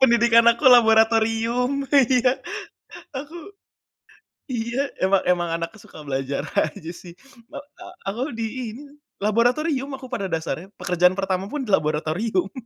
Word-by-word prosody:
Pendidikan 235 -2 +5
aku 235 +5 +1
laboratorium, 230 +2 +4
iya. 255 -1 +3 0.8
Aku 295 +5 -8 1.2
iya, 240 +4 -2
emang 190 +1 +3
emang 175 -1 +1
anaknya 170 +6 -6
suka 155 - -13
belajar 135 0 -3
aja, 155 +1 -2
sih. 175 0 -13 0.3
Me - - -11 0.2
a - - -10 0.2
aku 245 +9 -3
di 225 0 -4
ini, 290 - -11 0.4
laboratorium 255 +6 +1
aku 260 -1 -12
pada 200 -6 -2
dasarnya, 165 +2 -4
pekerjaan 180 +1 +2
pertama 195 0 -2
pun 285 +3 -4
di 215 - -7
laboratorium. 175 +5 0
225 Hz, 130 wpm, -23 LUFS, 180-250 Hz, 1.2 s, Pendidikan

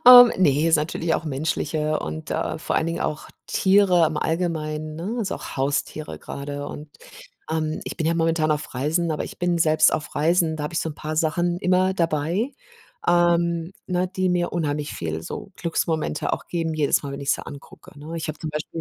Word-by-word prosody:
Oh, 245 -1 +12
ne, 155 -4 +3
ist 165 - +6
natürlich 160 +2 -1
auch - - -2
Menschliche 155 +1 -1
und, 80 0 -6
äh, - - -1
vor - - -2
allen 160 - +2
Dingen 165 0 -2
auch 155 0 -3 0.2
Tiere 190 -4 +4
im 155 - -3
Allgemeinen, 155 -2 -2
ne? 185 +8 -3
Also, 210 -4 -1
auch - - -8
Haustiere 145 +2 -2
grade. 145 0 -6
Und, 150 +1 -8 0.6
ähm, 155 -1 -1
ich - - -5
bin 160 - -1
ja 165 - +2
momentan 165 -1 +2
auf 150 -2 -2
Reisen, 160 +6 0
aber 155 - -1
ich - - -10
bin 175 -1 +1
selbst 155 -1 +5
auf 155 - -3
Reisen 160 +1 +2
da 150 - -4
habe 150 - -5
ich - - +1
so - - -2
'n - - -9
paar 155 +1 -5
Sachen 175 +2 +1
immer 185 0 +2
dabei, 170 - 0 0.6
ähm, 170 0 +3 0.2
ne, 180 0 +1
die 185 0 0
mir 175 -1 0
unheimlich 150 -3 -1
viel 80 -1 -4
so 195 - -6
Glücksmomente 160 - -1
auch - - -3
geben 165 -2 -2
jedes 150 -2 +2
Mal, 140 - -5
wenn 140 - -5
ich 140 - +1
sie - - -3
angucke, 145 +1 -12
ne? 155 +3 -7
Ich 160 -1 -4
habe 155 - -4
zum 160 - -4
Beispiel 150 +2 -4
160 Hz, 205 wpm, -24 LUFS, 150-175 Hz, 0.6 s, Oh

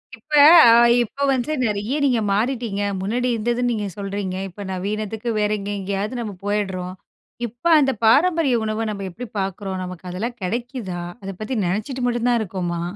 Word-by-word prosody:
இப்ப 235 +7 -14 0.7
இப்ப 275 +5 -5
வந்து 260 +2 -1
நிறைய 210 +3 -1
நீங்க 250 -4 +2
மாறிட்டீங்க. 225 -1 -1 0.2
முன்னாடி 240 +6 -1
இருந்தது 240 +2 -1
நீங்க 215 -3 -2
சொல்றீங்க. 195 -2 -4
இப்ப 190 +3 -11
நவீனத்துக்கு 215 +4 -3
வேற 210 0 +1
எங்கே 200 +1 -4
எங்கேயாவது 200 +5 -3
நம்ம 215 -3 -5
போயிட்றோம். 190 -3 -2 0.5
இப்ப 235 +5 -19
அந்த 270 -2 +3
பாரம்பரிய 305 +2 +4
உணவ 220 +1 -2
நம்ம 200 -2 -5
எப்டி 235 +8 -8
பாக்குறோம். 190 0 -3
நமக்கு 180 0 -8
அதெல்லாம் 235 +7 -4
கிடைக்குதா? 225 -3 -4 0.2
அத 195 - -4
பத்தி 230 +3 -3
நினைச்சிட்டு 215 +8 -2
மட்டுந்தான் 240 0 +1
இருக்கோமா? 180 -4 -3
215 Hz, 150 wpm, -22 LUFS, 195-240 Hz, 0.7 s, பாரம்பரிய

